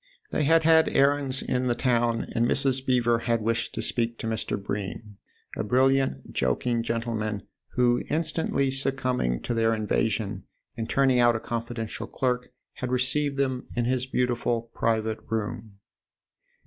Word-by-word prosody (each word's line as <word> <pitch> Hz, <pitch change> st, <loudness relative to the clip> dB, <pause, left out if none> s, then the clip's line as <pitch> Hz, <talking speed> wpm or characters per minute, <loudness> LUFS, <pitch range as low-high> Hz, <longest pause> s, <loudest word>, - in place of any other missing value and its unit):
They 150 Hz, -, +1 dB
had 165 Hz, +2 st, +5 dB
had 160 Hz, 0 st, +5 dB
errands 140 Hz, -1 st, +2 dB
in 125 Hz, 0 st, 0 dB
the 120 Hz, -, +1 dB
town, 120 Hz, -2 st, +1 dB
and 115 Hz, +1 st, +2 dB
Mrs. 130 Hz, 0 st, +1 dB
Beever 120 Hz, -3 st, +2 dB
had 115 Hz, 0 st, 0 dB
wished 115 Hz, +2 st, -1 dB
to -, -, -2 dB
speak 115 Hz, -1 st, -1 dB
to -, -, -6 dB
Mr. 110 Hz, -2 st, -2 dB
Bream, 100 Hz, +1 st, -5 dB, 0.4 s
a -, -, -2 dB
brilliant, 130 Hz, -, +1 dB
joking 115 Hz, -, 0 dB
gentleman, 115 Hz, -3 st, -2 dB, 0.3 s
who, 120 Hz, -1 st, +3 dB
instantly 155 Hz, -3 st, 0 dB
succumbing 130 Hz, -, -1 dB
to 120 Hz, -, -2 dB
their 115 Hz, 0 st, +2 dB
invasion 105 Hz, -2 st, -1 dB, 0.3 s
and 115 Hz, -1 st, -4 dB
turning 135 Hz, -2 st, +3 dB
out 120 Hz, -1 st, +5 dB
a -, -, -1 dB
confidential 115 Hz, -1 st, -4 dB
clerk, 125 Hz, -1 st, -1 dB, 0.3 s
had 130 Hz, -, -3 dB
received 135 Hz, +3 st, +1 dB
them 130 Hz, -2 st, -1 dB
in 120 Hz, -1 st, 0 dB
his 130 Hz, +1 st, 0 dB
beautiful 120 Hz, -2 st, -1 dB
private 110 Hz, -1 st, 0 dB
room. 110 Hz, -1 st, -3 dB
120 Hz, 150 wpm, -26 LUFS, 115-130 Hz, 0.4 s, had